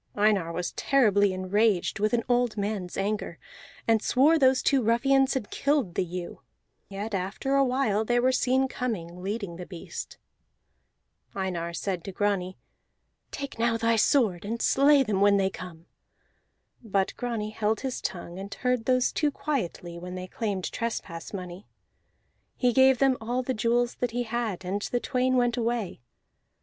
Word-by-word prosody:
Einar 205 -5 +2
was 175 +1 -3
terribly 205 -7 +3
enraged 195 +2 +1
with 215 +1 +1
an 235 -1 +1
old 245 -2 +1
mans 200 -3 -3
anger, 205 +2 -2 0.5
and 225 -2 +4
swore 295 +8 +4
those 260 -1 +4
two 275 -2 +3
ruffians 270 +4 +3
had 240 -6 -3
killed 280 - 0
the - - 0
ewe; 180 0 -6 0.5
yet 205 +2 -5
after 195 +8 -2
a 275 0 +5
while 250 -5 +1
they 240 +2 +1
were 255 +2 +3
seen 260 +1 +2
coming, 180 -10 -4
leading 200 -3 -4
the 180 - -7
beast. 175 -3 -8 1.2
Einar 180 -3 -2
said 180 -1 -3
to 195 - -6
Grani, 190 -2 -1 0.7
"Take 280 -4 -6
now 230 0 +2
thy 230 0 +2
sword 215 - +2
and 225 +3 -3
slay 280 +2 +5
them 205 -5 -1
when 200 0 +5
they 195 -1 +1
come." 170 -3 -10 1.0
But 200 -4 0
Grani 230 -4 -3
held 215 0 -1
his 265 -2 -3
tongue 175 0 -5
and 200 +1 -7
heard 250 +1 -1
those 255 -1 +2
two 300 - +1
quietly 180 - -4
when 180 +1 -7
they 185 0 -5
claimed 195 -1 -3
trespass 190 -8 -4
money; 185 0 -7 0.9
he 250 -2 +2
gave 265 0 +6
them 270 -1 +3
all 245 +3 -1
the 260 - -1
jewels 235 +2 +1
that 245 - -1
he 245 +2 -2
had, 225 -5 -3
and 195 +3 -2
the 245 - -1
twain 255 0 +1
went 245 0 +2
away. 230 - -2
220 Hz, 160 wpm, -27 LUFS, 190-250 Hz, 1.2 s, gave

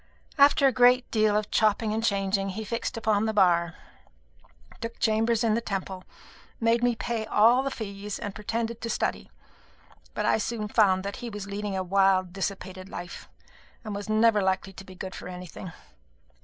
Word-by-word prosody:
After 280 0 +6
a 270 - +6
great 250 0 +4
deal 215 -2 +3
of 210 0 -3
chopping 215 0 +2
and 225 +1 -2
changing, 195 -2 0
he 210 +3 -5
fixed 230 +3 -3
upon 220 -1 +1
the 220 - -2
Bar, 170 -4 +3 1.0
took 230 0 -6
chambers 225 +1 +1
in 225 -2 +2
the 230 - 0
Temple, 190 -3 -5 0.5
made 230 +1 +2
me 245 -1 +2
pay 225 -1 -3
all 230 +4 +5
the 275 - -2
fees, 205 -4 -6
and 205 - -5
pretended 230 +2 -3
to 230 - -4
study. - - -2 0.9
But - - -1
I - - +3
soon 215 0 -3
found 190 -4 +3
that 200 0 -5
he 240 - -6
was 205 -2 -6
leading 200 -1 -4
a 190 - -1
wild 190 -1 +2
dissipated 190 -1 -5
life, 175 -2 -8 0.5
and 215 -3 -5
was 205 +1 -6
never 215 -1 +4
likely 190 +1 -1
to 195 - -10
be 190 -1 -13
good 185 +1 -7
for - - -8
anything. 180 0 -8
210 Hz, 180 wpm, -27 LUFS, 195-230 Hz, 1.0 s, After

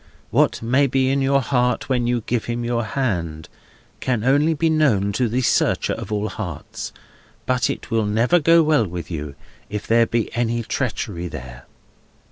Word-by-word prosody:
What - - +2
may 130 +5 +3
be 130 0 +1
in 140 0 +1
your 140 +1 +3
heart 125 -1 0
when 125 -3 0
you 120 -1 +1
give 120 -2 -1
him 120 0 -3
your 120 0 0
hand, 90 - -2 0.5
can 120 -4 -1
only 145 +5 +3
be 165 +2 +1
known 135 -11 +2
to 120 +3 0
the 125 +4 0
Searcher - - +2
of - - -7
all 105 0 -1
hearts; - - -6 0.5
but 125 -1 +1
it - - -5
will 110 -2 +1
never 115 +11 +3
go 165 +1 +5
well 150 -8 +3
with 90 0 -7
you, 75 -3 -5 0.3
if 105 0 -4
there 115 0 +4
be 115 -1 -1
any 120 0 0
treachery 110 -8 -3
there. 65 -5 -9
120 Hz, 175 wpm, -21 LUFS, 105-135 Hz, 0.5 s, go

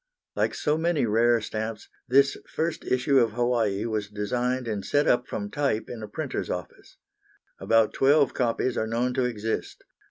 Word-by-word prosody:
Like - - 0
so 150 +1 0
many 165 -5 +1
rare 115 +2 +3
stamps, 110 0 -5 0.2
this 135 +2 +4 0.2
first 165 +1 -1
issue 130 +2 +3
of 115 -3 +2
Hawaii 115 -4 0
was 110 -3 -2
designed 120 +5 -2
and 105 -3 -3
set 145 +1 +1
up 125 0 +2
from 100 -1 -5
type 140 -7 -1
in 120 -2 -7
a 110 - -6
printer's - - -4
office. - - -7 0.6
About 115 -1 +3
twelve 140 0 +4
copies 120 0 0
are 110 - -1
known 120 +3 0
to 125 0 +1
exist. 115 -2 -3
120 Hz, 165 wpm, -26 LUFS, 110-130 Hz, 0.6 s, this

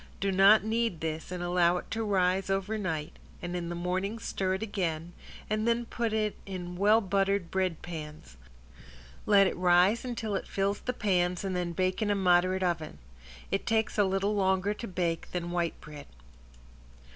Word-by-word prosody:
Do 195 0 0
not 195 +2 +6
knead 225 -5 0
this 160 +1 -4
and 180 -1 -4
allow 175 0 +3
it - - -8
to 225 0 -1
rise 190 -2 +1
over 195 +3 -1
night, 165 -6 -4 0.2
and 175 0 -5
in 170 -1 -3
the 175 - -4
morning 185 +5 -2
stir 190 -3 -2
it 190 - -4
again, 175 -5 -3 0.3
and 215 +1 -1
then 235 0 +1
put 230 -1 -2
it 215 -1 0
in 180 -2 -6
well 210 +4 +4
buttered 195 -2 0
bread 185 -4 -1
pans: 155 -3 -8 0.9
let 200 -2 +6
it - - 0
rise 180 +5 +4
until 230 -4 -3
it 195 - -2
fills 200 +1 -1
the 250 - -3
pans 180 -5 0
and 190 -2 -2
then 175 -1 -2
bake 185 +4 0
in 215 - +1
a 205 - +2
moderate 185 0 +3
oven. 170 -3 -2 0.5
It - - -1
takes 220 -1 +1
a 205 - +4
little 195 +2 0
longer 190 0 +1
to 230 +2 -7
bake 170 -3 -2
than 175 -1 -3
white 175 -1 -1
bread. 150 -1 -11
190 Hz, 180 wpm, -29 LUFS, 175-205 Hz, 0.9 s, not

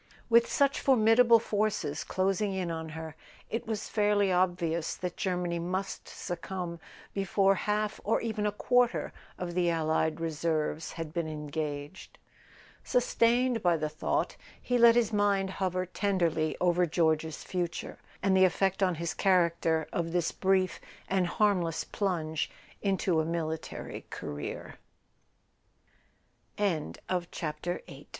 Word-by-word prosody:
With 235 0 +5
such 280 -1 +2
formidable 235 -2 +6
forces 210 -9 -1
closing 195 +1 0
in 180 -3 -2
on 160 -1 -4
her 160 -1 -7 0.4
it 230 0 -3
was 215 -2 -3
fairly 205 -2 +2
obvious 175 -3 +1
that 180 -1 -4
Germany 180 -2 -1
must 185 +3 -3
succumb 175 -1 -5 0.3
before 195 0 +3
half 210 +2 -1
or 215 - +2
even 220 -2 -1
a - - +1
quarter 245 +3 +1 0.2
of 175 -1 -4
the 175 -1 +2
allied 160 -1 +1
reserves 160 -1 -1
had 165 -2 -6
been 170 -2 -1
engaged. 150 +1 -5 0.7
Sus¬ - - 0
tained 240 0 +3
by 175 -3 +3
the 155 -1 -2
thought, 155 +1 -1 0.2
he 245 -1 0
let 235 0 +8
his 230 -2 +2
mind 200 -2 +2
hover 185 -1 -1
tenderly 170 -5 0
over 180 0 +3
George's 160 -1 0
future, 175 -2 -4 0.2
and 195 -1 +3
the 190 - +6
effect 190 +1 +2
on 185 -2 +3
his 170 +1 -3
character 170 -4 +2
of 165 -1 -2
this 175 -2 +1
bri 190 -1 +2
185 Hz, 110 wpm, -30 LUFS, 165-210 Hz, 0.7 s, let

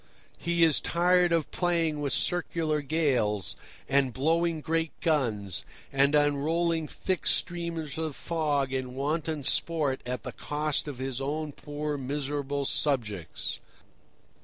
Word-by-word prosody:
He 170 0 +2
is 160 -3 +5
tired 175 +1 +3
of 165 -3 +1
playing 165 -4 +1
with 140 -2 -1
circular 165 -1 +1
gales, 130 - +1 0.3
and 135 -1 +3
blowing 165 +4 +1
great 160 +1 -1
guns, 110 - 0 0.3
and 140 +2 +4
unrolling 155 +3 +2
thick 185 +3 -2
streamers 165 -4 0
of 160 -3 -2
fog 145 -5 0
in 130 -1 -3
wanton 150 +2 -1
sport 150 -2 +1
at 125 +1 -4
the - - -4
cost 150 0 -1
of 145 -4 -5
his 130 0 -3
own 150 +2 -2
poor, 145 0 -4
miserable 140 +1 -2
subjects. 105 - -1
150 Hz, 125 wpm, -29 LUFS, 135-165 Hz, 0.3 s, is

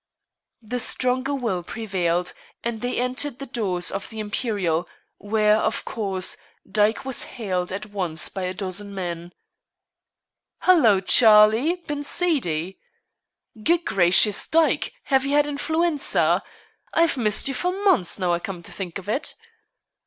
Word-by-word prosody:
The 245 +3 -3
stronger 255 +4 +1
will 225 -9 -2
prevailed, 180 -3 -2 0.3
and 230 -2 -3
they 245 0 -2
entered 250 +2 -1
the 275 - -7
doors 195 -9 -1
of 195 - -5
the 220 - -7
Imperial, 205 -6 -1 0.3
where, 210 +1 +2
of - - -1
course, 195 -4 -1 0.3
Dyke 210 +4 +1
was 265 -1 -2
hailed 185 -6 -2
at 200 +3 -4
once 185 -6 -1
by 195 - -6
a 180 - -3
dozen 200 +1 -3
men. 175 -2 -5 1.3
"Hallo, 240 - +5
Charlie! 220 - +5
Been 295 -2 -3
seedy?" 195 - 0 0.8
"Good 340 +4 +2
gracious, 190 +2 +3
Dyke! 325 0 +2
have 265 -2 +2
you 275 +1 -1
had 295 0 +4
influenza? 310 +1 +1 0.5
I've 330 -2 +3
missed 220 -3 0
you 275 - -2
for 360 +7 -1
months, 375 - +2
now 180 -2 0
I 170 - 0
come 180 -2 -7
to - - -12
think 185 -3 -6
of 195 - -10
it." 240 +8 -2
215 Hz, 140 wpm, -23 LUFS, 185-270 Hz, 1.3 s, Hallo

